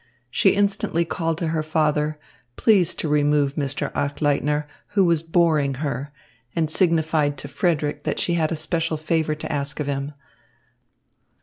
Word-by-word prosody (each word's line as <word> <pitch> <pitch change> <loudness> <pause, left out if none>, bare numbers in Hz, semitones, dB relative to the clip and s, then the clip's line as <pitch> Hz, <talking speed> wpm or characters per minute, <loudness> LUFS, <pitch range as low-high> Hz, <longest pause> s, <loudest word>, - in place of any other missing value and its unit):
She 195 - +3
instantly 200 -4 +1
called 165 -1 -2
to 165 -2 -2
her 160 -1 0
father, 155 -1 0 0.4
please 195 -7 +3
to - - -2
remove 145 -1 +2
Mr. 140 -1 -2
Achleitner, 145 +1 0 0.3
who 195 - +6
was 170 -3 +3
boring 160 -4 +2
her, 140 0 -4 0.4
and 160 -2 0
signified 160 -5 +2
to 140 - -5
Frederick 150 -2 -1
that - - -2
she 175 - 0
had 160 -2 +1
a - - 0
special 160 +1 -1
favour 155 0 0
to 155 - -6
ask 140 -1 -2
of 150 - -1
him. 140 +1 -3
155 Hz, 150 wpm, -23 LUFS, 145-165 Hz, 0.4 s, who